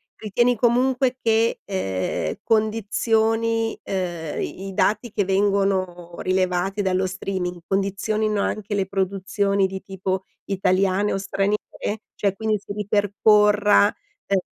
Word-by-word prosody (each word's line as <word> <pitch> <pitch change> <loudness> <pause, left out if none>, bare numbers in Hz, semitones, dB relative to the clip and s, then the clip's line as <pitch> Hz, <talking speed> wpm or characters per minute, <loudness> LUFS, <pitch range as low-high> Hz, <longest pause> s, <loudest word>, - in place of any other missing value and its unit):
ritieni 240 +4 +1
comunque 250 +2 +2
che, 225 0 +2
ehm, 95 - -2
condizioni, 225 +1 +1
ehm 175 -5 -3
i 195 +1 -5
i 195 - -6
dati 215 +4 +1
che 200 - 0
vengono 190 -3 0
rilevati 185 +2 0
dallo 190 -1 +1
streaming, 180 -1 -3
condizionino 200 +2 0
anche 210 0 -2
le 195 -1 +1
produzioni 195 +1 0
di 190 0 -6
tipo 190 0 -3 0.2
italiane 195 +1 +1
o - - 0
straniere? 195 +1 0 0.6
Cioè, 200 -2 0
quindi 220 0 0
si 200 - -8
ripercorra, 210 0 +4 0.4
ehm, 195 -1 +2
200 Hz, 115 wpm, -23 LUFS, 190-215 Hz, 0.6 s, ripercorra